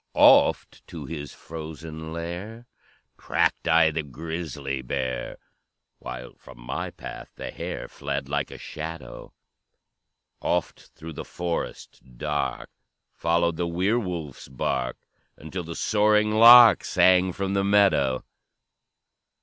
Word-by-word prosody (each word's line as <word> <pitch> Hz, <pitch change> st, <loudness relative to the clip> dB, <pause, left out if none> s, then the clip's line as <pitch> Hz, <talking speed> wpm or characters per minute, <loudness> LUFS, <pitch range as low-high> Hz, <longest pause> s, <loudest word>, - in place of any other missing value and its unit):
"Oft -, -, +5 dB
to -, -, -8 dB
his 75 Hz, -3 st, -6 dB
frozen 80 Hz, 0 st, -8 dB
lair 90 Hz, +8 st, -6 dB, 0.5 s
Tracked -, -, 0 dB
I 80 Hz, -1 st, +5 dB
the 80 Hz, +1 st, -2 dB
grisly 75 Hz, -2 st, -5 dB
bear, 65 Hz, -1 st, -3 dB, 0.6 s
While 60 Hz, 0 st, -8 dB
from 65 Hz, -2 st, -15 dB
my -, -, -4 dB
path -, -, -9 dB
the -, -, -6 dB
hare -, -, -6 dB
Fled 70 Hz, -1 st, -4 dB
like 70 Hz, 0 st, -2 dB
a -, -, -9 dB
shadow; 80 Hz, -5 st, -8 dB, 1.1 s
Oft 90 Hz, 0 st, -2 dB
through 80 Hz, 0 st, -9 dB
the -, -, -6 dB
forest 85 Hz, -1 st, -5 dB, 0.2 s
dark 75 Hz, +2 st, -3 dB, 0.4 s
Followed 85 Hz, 0 st, +1 dB
the 85 Hz, -, -1 dB
were 95 Hz, +7 st, +1 dB
wolf's 85 Hz, -, -6 dB
bark, 65 Hz, -1 st, -2 dB, 0.4 s
Until 85 Hz, +5 st, -6 dB
the 85 Hz, 0 st, -7 dB
soaring 105 Hz, 0 st, +2 dB
lark 115 Hz, +2 st, +9 dB
Sang 90 Hz, 0 st, +4 dB
from 95 Hz, +2 st, -3 dB
the 100 Hz, 0 st, +1 dB
meadow. 100 Hz, -11 st, +3 dB
80 Hz, 115 wpm, -25 LUFS, 70-90 Hz, 1.1 s, lark